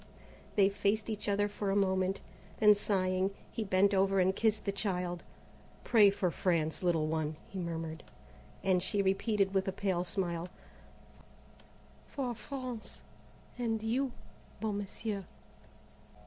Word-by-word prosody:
They 200 -2 +6
faced 205 +2 0
each 210 -1 -3
other 205 +1 +2
for 205 -1 -3
a 195 - +1
moment. 190 -1 +1 0.4
Then 210 -1 +7
sighing, 190 -2 +1 0.2
he 225 - -2
bent 195 0 +3
over 195 0 +3
and 190 +1 +3
kissed 220 0 +1
the 200 - +1
child. 180 -3 -2 0.6
"Pray 215 -4 +6
for 190 -3 0
France, 165 -3 0
little 170 -4 +2
one," 155 -1 -1
he 195 - -6
murmured, 165 -2 -4 0.6
and 185 -2 +3
she 200 +2 +1
repeated 195 0 +1
with 190 0 +1
a - - +1
pale 185 -2 0
smile: 175 -2 -2 1.6
"For 255 -4 -3
France 250 -1 -7 0.6
and 225 -2 -1
you, 250 +4 0 0.5
beau 220 -1 -1
Monsieur." 205 0 -3
195 Hz, 135 wpm, -32 LUFS, 185-210 Hz, 1.6 s, Then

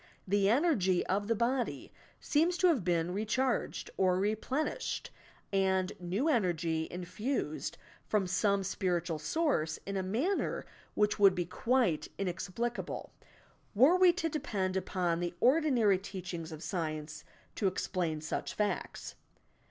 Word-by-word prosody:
The 200 +1 +3
energy 225 - +3
of 205 +2 0
the 230 - +2
body 240 +3 -1 0.3
seems 335 +4 +2
to 365 - +4
have 275 - +2
been 170 0 0
recharged 220 +5 -1
or 185 -1 +3
replenished, 235 - -2 0.4
and 190 -1 +2
new 185 - -1
energy 170 - +1
infused 180 - -3 0.3
from 210 -3 +1
some 195 +2 +1
spiritual 175 -4 -1
source 160 - 0
in 195 - -4
a - - 0
manner 245 - -1 0.3
which 210 0 +2
would 195 -2 +6
be 175 - -1
quite 230 -2 +1
inexplicable, 200 +5 -3 0.6
were 270 - +6
we 365 -1 +7
to 330 -2 -1
depend 210 -12 -2
upon 180 -2 0
the 175 0 -3
ordinary 250 - +4
teachings 180 -4 -6
of 155 +1 -8
science 155 -4 -4 0.3
to 200 - 0
explain 175 -4 -1
such 155 - -4
facts. 210 -1 -2
195 Hz, 130 wpm, -32 LUFS, 175-240 Hz, 0.6 s, we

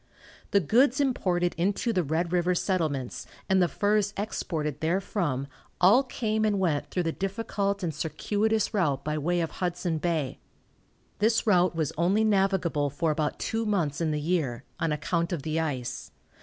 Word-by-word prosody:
The 200 - +4
goods 245 - +3
imported 180 - +1
into 200 +6 +1
the 185 - +2
Red 165 +2 -1
river 180 0 +2
settlements 155 -10 -1 0.2
and 190 0 +3
the 175 - +4
furs 205 +5 +1
exported 160 -7 -3
therefrom 165 -5 -1 0.3
all 200 +9 +6
came 220 -4 -1
and 210 -2 +2
went 165 -6 0
through 180 - -1
the 165 - 0
difficult 200 +1 -2
and 165 -3 -1
circuitous 205 +9 0
route 160 -10 +1
by 150 0 -1
way 175 +4 0
of 165 - -2
Hudson 175 -2 -2
Bay. 160 -5 -1 0.8
This 220 +2 +2
route 180 -4 +3
was 160 -3 -1
only 190 +6 +3
navigable 190 -8 +2
for 155 +3 0
about 150 -1 -1
two 225 +1 -2
months 175 -9 0
in 165 - +1
the 150 -1 -1
year, 145 -7 -1 0.2
on 165 -2 0
account 170 +3 -1
of 165 -6 -3
the 160 0 -1
ice. 135 -6 -3
175 Hz, 165 wpm, -27 LUFS, 155-200 Hz, 0.8 s, all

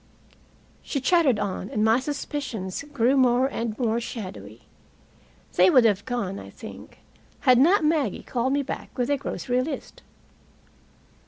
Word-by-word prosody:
She 280 - -3
chattered 280 - +3
on, 200 -1 -3
and 210 0 0
my 225 +2 +4
suspicions 265 -8 -4
grew 260 -1 +2
more 255 -1 +4
and 230 -5 -3
more 235 -2 0
shadowy. 115 - -8 0.9
They 185 +1 +5
would 250 +1 +6
have 205 -4 +2
gone, 230 -6 -3
I - - -10
think, - - -12 0.4
had 255 -2 +5
not 335 +5 +4
Maggie 300 - 0
called 255 +2 -1
me 285 0 +1
back 280 - -7
with 250 +2 0
a 285 - +2
grocery 250 -2 -2
list. 300 - -6
245 Hz, 145 wpm, -25 LUFS, 215-280 Hz, 0.9 s, would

